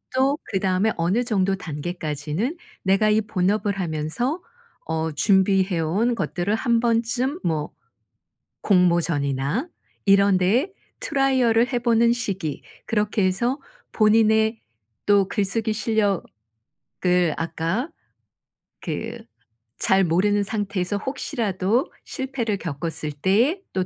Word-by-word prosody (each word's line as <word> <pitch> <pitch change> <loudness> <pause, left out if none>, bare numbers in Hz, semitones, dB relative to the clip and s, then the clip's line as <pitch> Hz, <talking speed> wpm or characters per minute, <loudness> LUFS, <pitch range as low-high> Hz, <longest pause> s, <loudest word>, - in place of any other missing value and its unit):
또 270 +2 +2
그다음에 190 +1 +1
어느 180 +9 +1
정도 195 -5 +1
단계까지는 160 - -4 0.3
내가 195 +3 +3
이 215 +1 +3
본업을 200 0 0
하면서 175 - -2 0.4
어 160 0 -2
준비해 190 +2 +2
온 195 +10 +1
것들을 190 -2 -2
한번쯤 235 +5 +1
뭐 155 -2 -1 0.9
공모전이나 170 - +1 0.4
이런 200 -1 +5
데에 230 - +2 0.3
트라이얼을 260 - +2
해 245 - +2
보는 235 -1 +3
시기 195 -10 -3 0.2
그렇게 210 -2 0
해서 240 +9 0 0.3
본인의 220 0 +3 0.4
또 200 -2 +4
글쓰기 215 +3 -1
실력을 205 - -1 0.9
아까 165 - -2 0.9
그 - - -4 0.6
잘 190 0 +4
모르는 200 +4 +2
상태에서 200 -2 -2
혹시라도 230 - -1
실패를 260 -6 -3
겪었을 155 -2 -4
때의 220 - +2
또 185 -1 -1
200 Hz, 235 characters per minute, -23 LUFS, 180-230 Hz, 0.9 s, 이런